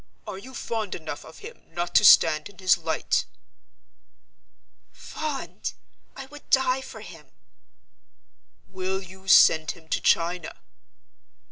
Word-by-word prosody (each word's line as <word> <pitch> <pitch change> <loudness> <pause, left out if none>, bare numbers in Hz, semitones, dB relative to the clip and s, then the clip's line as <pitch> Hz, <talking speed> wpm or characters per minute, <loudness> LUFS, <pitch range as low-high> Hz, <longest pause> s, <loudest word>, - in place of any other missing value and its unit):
Are 190 - -7
you 260 +6 -12
fond 220 -4 -4
enough 155 -3 -7
of 160 - -14
him - - -11
not 175 0 -3
to - - +5
stand 155 0 +6
in 200 - -19
his 185 -1 +3
light?" - - -1 1.7
"Fond! 300 -3 -6 0.4
I 270 - -8
would 290 +2 -15
die 265 0 +2
for 260 - -11
him!" - - -13 1.4
"Will 190 +1 -4
you 190 +1 -15
send 160 -4 +6
him 160 -1 -19
to - - -1
China?" 170 0 0
190 Hz, 125 wpm, -25 LUFS, 170-255 Hz, 1.7 s, stand